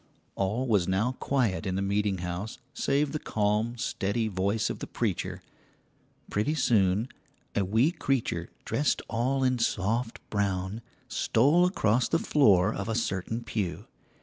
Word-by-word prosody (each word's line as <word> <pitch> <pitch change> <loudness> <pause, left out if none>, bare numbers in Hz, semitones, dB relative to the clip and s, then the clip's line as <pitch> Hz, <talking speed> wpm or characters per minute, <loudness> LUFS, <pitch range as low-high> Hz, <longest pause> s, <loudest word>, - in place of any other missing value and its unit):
All 105 +7 -1
was 100 -7 +2
now 100 +6 +1
quiet 115 -8 0
in 95 - -1
the 95 - 0
meeting 100 0 0
house 90 +5 -4 0.2
save 140 +1 +1
the 155 - -2
calm, 110 +2 0
steady 110 0 -1
voice 100 +2 0
of - - -6
the - - -5
preacher. - - -2 0.9
Pretty 110 +10 +1
soon 105 -5 +2 0.5
a 100 - +2
wee 110 - +3
creature 135 -8 -1 0.2
dressed 145 - 0
all 130 +4 0
in 130 -1 +2
soft 115 +2 0
brown 100 +1 -1 0.3
stole 150 +10 +3
across 120 - +2
the 165 - +3
floor 105 - +4
of 100 +3 -4
a 110 - 0
certain 115 +1 -2
pew. 100 -6 -3
110 Hz, 145 wpm, -28 LUFS, 100-125 Hz, 0.9 s, floor